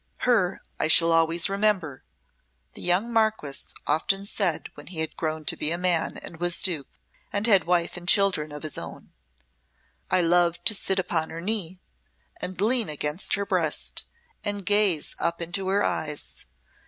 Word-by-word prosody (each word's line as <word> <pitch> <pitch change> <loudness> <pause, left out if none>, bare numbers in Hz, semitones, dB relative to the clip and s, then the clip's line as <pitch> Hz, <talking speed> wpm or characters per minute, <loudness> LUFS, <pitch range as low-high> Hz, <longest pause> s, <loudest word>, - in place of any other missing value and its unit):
"Her 210 -7 +2 0.2
I - - +2
shall 165 +1 +5
always 165 +1 +4
remember," 195 -8 0 0.7
the - - -8
young 190 +7 +1
Marquess 220 -11 0
often 195 +6 0
said 195 -5 -1
when 145 - -13
he 180 - -9
had 160 0 -3
grown 155 -1 -3
to - - +1
be 150 - 0
a 170 - 0
man 175 -2 0
and 165 - -9
was 175 0 +1
Duke, 160 -8 +1 0.4
and 205 +1 -1
had 200 -7 +4
wife 175 0 0
and 175 0 -9
children 190 -6 +3
of 150 +1 -8
his 155 - -2
own. - - -10 1.0
"I 185 - +4
loved 175 0 +2
to 220 - +5
sit 195 -1 -1
upon 165 -4 -1
her 165 - -7
knee, 185 -2 -2 0.6
and 185 0 -4
lean 225 +1 +2
against 150 +3 0
her 200 0 -2
breast, - - -1 0.4
and 205 -2 -3
gaze 205 -7 +2
up 170 0 -1
into 175 +3 -2
her 195 +2 +2
eyes. 150 -2 -3
175 Hz, 165 wpm, -25 LUFS, 160-200 Hz, 1.0 s, shall